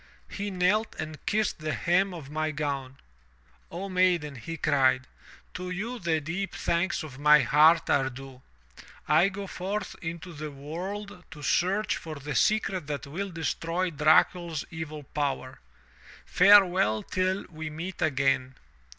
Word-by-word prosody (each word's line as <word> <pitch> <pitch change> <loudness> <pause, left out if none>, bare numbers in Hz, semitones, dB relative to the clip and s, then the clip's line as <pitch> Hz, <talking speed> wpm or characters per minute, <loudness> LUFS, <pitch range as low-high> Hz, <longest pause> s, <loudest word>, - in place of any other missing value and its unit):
He 205 0 -4
knelt 195 +4 +1
and 155 -1 -6
kissed 215 -3 0
the 155 0 -2
hem 185 +3 +2
of 155 -6 -9
my 155 +1 -1
gown. 140 -3 -3 0.4
" 60 +1 -34
'O 185 +4 -5
maiden,' 180 -5 +2
he 165 +8 -6
cried, 130 -3 +2 0.5
*to 180 0 -5
you 220 +7 -4
the 165 -3 0
deep 180 +6 -4
thanks 170 +1 0
of 140 -4 -10
my 150 0 +6
heart 155 +6 +5
are 135 -2 +2
due. 130 0 -11 0.7
I 160 +6 +5
go 200 0 -6
forth 195 +2 -4
into 170 +1 -6
the 150 0 -6
world 180 +7 -7
to 150 -2 -11
search 190 +7 +1
for 160 -2 -7
the 145 0 -6
secret 185 - +1
that 145 -1 -4
will 185 +8 -4
destroy 170 +1 -2
Dracul's 160 +1 +2
evil 155 -2 -6
power. 135 -2 -3 0.7
Farewell 185 - +5
till 185 +1 -1
we 160 -1 -6
meet 165 +4 -6
again.' 135 -3 +1
160 Hz, 145 wpm, -28 LUFS, 145-185 Hz, 0.7 s, my